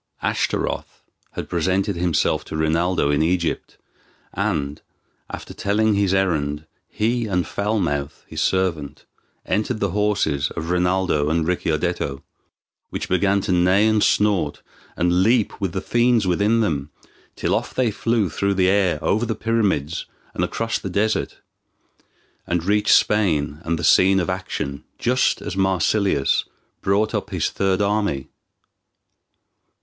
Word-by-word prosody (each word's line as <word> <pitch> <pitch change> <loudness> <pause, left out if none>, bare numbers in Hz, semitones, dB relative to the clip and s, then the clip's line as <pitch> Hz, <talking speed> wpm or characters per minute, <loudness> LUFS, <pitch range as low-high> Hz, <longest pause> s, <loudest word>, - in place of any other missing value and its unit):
Ashtaroth - - -2 0.3
had - - -5
presented 95 +4 0
himself 85 -2 +1
to - - -5
Rinaldo 80 0 +1
in 75 +1 +2
Egypt, 85 +1 -1 0.6
and, 80 -8 -2 0.5
after - - -8
telling 105 +2 +1
his 100 -2 +1
errand, 80 -6 0 0.2
he 115 +2 0
and 90 -4 0
Foul 105 +6 -1
mouth, 75 -4 -2
his - - -5
servant, 85 -7 -1 0.4
entered 110 +2 -1
the 100 -3 0
horses 95 -8 0
of 80 +2 -3
Rinaldo 90 -4 +1
and 80 0 +1
Ricciardetto, 70 -5 -1 0.7
which - - -5
began 100 +2 +2
to 95 - -2
neigh, 90 +3 +4
and 110 -1 +3
snort, 100 -8 +1 0.3
and 90 +1 +2
leap 110 0 +2
with 95 -3 -1
the 95 - -3
fiends 120 -2 +2
within 100 +6 +2
them, 75 -9 -1 0.5
till - - -1
off - - -2
they 125 -4 +2
flew 115 -1 0
through 100 +5 -1
the 95 -1 +3
air 95 -2 +2
over 110 +3 +1
the 115 - -1
pyramids 100 -10 -1 0.3
and - - -1
across 115 0 -2
the 95 - -5
desert, 105 +4 -1 1.1
and 85 -1 0
reached 105 +2 +4
Spain 80 -9 +1
and 85 0 -1
the - - -5
scene 95 +1 +5
of 90 +1 -1
action 70 -6 -4
just 125 +1 +1
as - - -5
Marsilius 95 -4 +1 0.4
brought 105 +3 +1
up - - -2
his - - -1
third 95 0 +1
army. 100 -10 -1
95 Hz, 140 wpm, -22 LUFS, 80-105 Hz, 1.1 s, scene